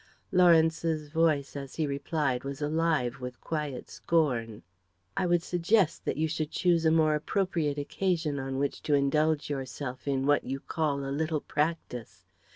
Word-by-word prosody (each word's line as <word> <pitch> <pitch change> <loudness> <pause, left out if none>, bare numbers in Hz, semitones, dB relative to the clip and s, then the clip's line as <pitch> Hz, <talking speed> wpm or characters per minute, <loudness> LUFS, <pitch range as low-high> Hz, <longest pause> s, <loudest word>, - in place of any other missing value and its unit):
Lawrence's 165 -3 +3
voice 155 -3 +1
as 140 -2 -7
he 160 - 0
replied 140 -2 -1
was 140 0 -5
alive 150 -5 0
with 125 -1 -6
quiet 150 -5 -4
scorn. 125 -10 0 0.5
"I 185 - +1
would 175 -1 +2
suggest 180 +1 +1
that - - -1
you 160 +1 +1
should 155 -1 -2
choose 170 -1 +2
a 160 - +5
more 160 -1 +4
appropriate 160 -2 0
occasion 160 -1 -1
on 135 0 -3
which 140 0 -1
to 150 - +2
indulge 150 +2 +2
yourself 130 -1 -5
in 135 -1 0
what 145 0 +3
you 135 +1 -4
call 140 -2 -2
a 135 - -3
little 155 0 -1
practice. 125 - -3
150 Hz, 160 wpm, -29 LUFS, 140-165 Hz, 0.5 s, a